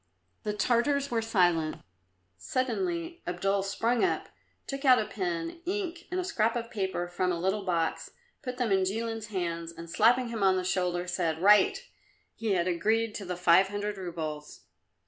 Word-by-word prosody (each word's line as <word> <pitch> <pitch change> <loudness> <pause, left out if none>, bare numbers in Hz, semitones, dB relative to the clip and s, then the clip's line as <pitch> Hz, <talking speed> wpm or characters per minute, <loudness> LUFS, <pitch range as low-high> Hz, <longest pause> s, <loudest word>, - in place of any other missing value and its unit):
The 210 - -2
Tartars 265 +6 +1
were 230 -1 +1
silent. 175 -8 +2 0.6
Suddenly 335 - -2
Abdul 195 +3 0
sprang 225 +5 0
up, 375 - 0 0.4
took 275 0 -5
out 255 -2 +7
a 220 - 0
pen, 175 - -3
ink 365 -3 -3
and 365 - -2
a - - 0
scrap 230 - +1
of 235 -1 -4
paper 190 -4 -2
from 180 +1 -1
a 170 - -2
little 190 +4 0
box, 170 -3 -1 0.3
put 250 -4 -5
them 245 -5 0
in 190 -1 +3
Jilin's 225 +3 -2
hands 170 -4 -3
and 170 0 -10
slapping 235 +7 +3
him 230 -2 -4
on 190 -1 +4
the 185 - -1
shoulder, 180 -1 0
said, 170 -3 -1
"Write." 205 +2 +5 0.5
He 220 -3 -1
had 175 -1 +1
agreed 215 +6 +1
to 200 - -6
the 180 -1 -4
five 180 +2 +5
hundred 205 0 -4
roubles. 155 -4 -6
200 Hz, 170 wpm, -29 LUFS, 175-235 Hz, 0.6 s, out